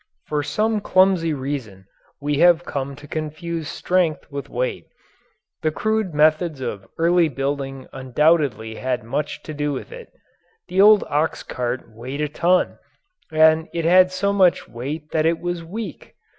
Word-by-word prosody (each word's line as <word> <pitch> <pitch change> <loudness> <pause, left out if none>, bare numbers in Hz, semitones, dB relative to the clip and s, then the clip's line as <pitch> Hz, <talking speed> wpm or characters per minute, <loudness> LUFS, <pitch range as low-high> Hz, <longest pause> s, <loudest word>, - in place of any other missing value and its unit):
For 150 -1 -1
some 210 +10 0
clumsy 185 -4 +3
reason 130 -9 -5 0.3
we 145 0 -1
have 175 0 +5
come 140 0 -4
to 145 +1 -13
confuse 155 +1 -4
strength 175 -4 0
with 140 -1 -6
weight. 125 +1 -2 0.8
The 155 - +1
crude 215 +3 -1
methods 155 0 +2
of 110 -6 -5
early 170 0 +3
building 135 0 -3
undoubtedly 130 -4 +1
had 130 -3 -2
much 135 +6 -3
to 155 - -7
do 145 0 -1
with - - -6
this. 485 -1 -10 0.6
The 190 +1 +3
old 210 0 +7
ox 150 +2 0
cart 125 0 -3
weighed 125 +6 -7
a 150 - +1
ton 175 +4 +1 0.5
and 160 +1 +4
it 165 -1 -1
had 185 +2 +6
so 200 +2 0
much 185 -3 +3
weight 145 +7 -6
that 160 0 +2
it 165 0 +2
was 175 -1 -3
weak! 190 0 -7
155 Hz, 155 wpm, -22 LUFS, 135-175 Hz, 0.8 s, old